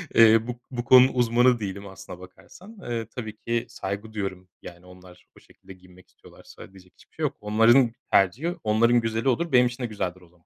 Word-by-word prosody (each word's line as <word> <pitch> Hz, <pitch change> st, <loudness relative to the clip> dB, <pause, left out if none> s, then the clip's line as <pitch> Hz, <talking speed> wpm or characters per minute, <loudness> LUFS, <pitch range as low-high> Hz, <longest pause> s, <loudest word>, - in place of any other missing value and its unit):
Eee, 115 Hz, 0 st, +5 dB
bu 125 Hz, -1 st, -6 dB
bu 120 Hz, -2 st, -4 dB
konunun 130 Hz, +2 st, +6 dB
uzmanı 120 Hz, 0 st, +2 dB
değilim 100 Hz, -1 st, -6 dB
aslına 95 Hz, -1 st, -11 dB
bakarsan, 180 Hz, -, -15 dB
eee, 115 Hz, -2 st, -4 dB
tabii 110 Hz, -3 st, -7 dB
ki 115 Hz, 0 st, -3 dB
saygı 105 Hz, -1 st, -7 dB
duyuyorum. 95 Hz, -3 st, -6 dB
Yani 85 Hz, +1 st, -13 dB
onlar 90 Hz, 0 st, -17 dB
o -, -, -15 dB
şekilde 95 Hz, 0 st, -17 dB
giyinmek 90 Hz, 0 st, -20 dB
istiyorlarsa -, -, -16 dB
diyecek 95 Hz, -2 st, -19 dB
hiçbir -, -, -25 dB
şey -, -, -6 dB
yok. -, -, -2 dB
Onların 115 Hz, +4 st, +3 dB, 0.2 s
tercihi 125 Hz, -, +1 dB
onların 115 Hz, +3 st, +2 dB
güzeli 115 Hz, +3 st, -1 dB
olur, 165 Hz, +6 st, -1 dB
benim 125 Hz, -1 st, +5 dB
için 125 Hz, +1 st, -7 dB
de 120 Hz, -, -2 dB
güzeldir 95 Hz, -4 st, -5 dB
o 90 Hz, -, -19 dB
zaman. 85 Hz, -1 st, -31 dB
110 Hz, 195 wpm, -24 LUFS, 95-120 Hz, 0.2 s, konunun